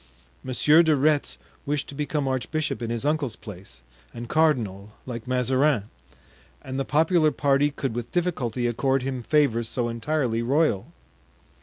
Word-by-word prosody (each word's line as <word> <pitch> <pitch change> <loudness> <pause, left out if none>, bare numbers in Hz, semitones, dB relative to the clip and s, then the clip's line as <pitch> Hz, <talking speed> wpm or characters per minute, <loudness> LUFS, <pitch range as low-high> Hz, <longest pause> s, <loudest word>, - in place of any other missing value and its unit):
Monsieur 150 +5 +4
de 160 -2 +3
Retz 145 +1 +1 0.3
wished 145 -1 -2
to - - -9
become 145 0 -2
archbishop 135 +2 -2
in 115 - -3
his 115 +3 -2
uncle's 145 -6 0
place, 95 - -11 0.3
and 120 0 -6
cardinal, 110 -10 0
like 120 -2 -6
Mazarin; 130 -2 +1 0.7
and 130 +1 -4
the - - +1
popular 160 +2 +3
party 145 -1 +2
could 135 -4 -4
with 120 -1 -5
difficulty 130 -10 -1
accord 130 +3 +1
him 130 -1 -3
favors 120 -4 +1
so 120 -2 -1
entirely 115 0 -1
royal. 130 -5 +1
135 Hz, 145 wpm, -25 LUFS, 120-150 Hz, 0.7 s, Monsieur